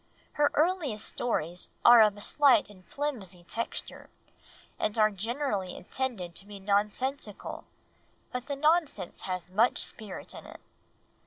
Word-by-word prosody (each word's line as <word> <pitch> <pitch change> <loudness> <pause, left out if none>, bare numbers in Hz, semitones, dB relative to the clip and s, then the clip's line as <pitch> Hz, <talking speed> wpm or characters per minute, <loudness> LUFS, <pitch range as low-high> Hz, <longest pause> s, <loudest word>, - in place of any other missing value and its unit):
Her 295 -1 +3
earliest 310 - +1
stories 175 -7 -2 0.2
are 240 -1 +10
of 210 -1 +4
a - - -9
slight 265 -5 +4
and 185 -2 -16
flimsy 215 -12 -4
texture, 230 +6 -5 0.7
and 215 +1 0
are 215 -1 +5
generally 210 -2 -2
intended 210 -7 -4
to 200 - -11
be 205 -1 -9
nonsensical, 210 +4 -1 0.7
but 250 0 -4
the 285 - -2
nonsense 300 - +1
has 185 -1 -4
much 225 +6 +3
spirit 215 -4 -5
in - - -10
it." - - -11
215 Hz, 135 wpm, -29 LUFS, 195-270 Hz, 0.7 s, are